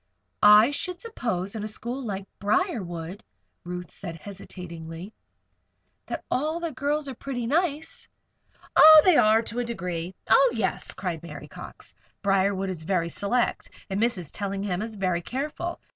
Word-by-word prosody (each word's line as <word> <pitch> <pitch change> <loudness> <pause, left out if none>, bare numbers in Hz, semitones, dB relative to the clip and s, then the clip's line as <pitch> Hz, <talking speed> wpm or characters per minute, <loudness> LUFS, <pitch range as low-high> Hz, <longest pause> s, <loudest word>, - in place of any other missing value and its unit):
"I 210 +5 +8
should 360 +4 -3
suppose 230 - -3
in 220 -2 -4
a - - -2
school 240 +5 -4
like 200 -4 -4
Briarwood," 200 - -1 0.4
Ruth 180 0 -6
said, 170 -4 -7
hesitatingly, 175 0 -9 0.9
"that - - -5
all 310 +5 0
the 335 -1 -3
girls 290 +2 -1
are 270 - -4
pretty 250 -1 -4
nice." 305 +3 -1 0.7
"Oh! 315 0 +10
they 365 -3 +6
are, 220 -2 +5
to 230 +2 -4
a - - +1
degree. 180 -6 -4
Oh, 270 -2 +6
yes!" 210 -4 -2
cried 175 -4 -3
Mary 170 - -9
Cox. - - -11 0.3
"Briarwood 195 -1 +2
is 175 -4 -6
very 170 0 0
select 235 +8 -1 0.2
and 195 +2 0
Mrs. 215 -10 0
Tellingham 195 -2 -2
is 220 0 -5
very 185 -3 0
careful. 295 - -4
210 Hz, 145 wpm, -26 LUFS, 180-265 Hz, 0.9 s, Oh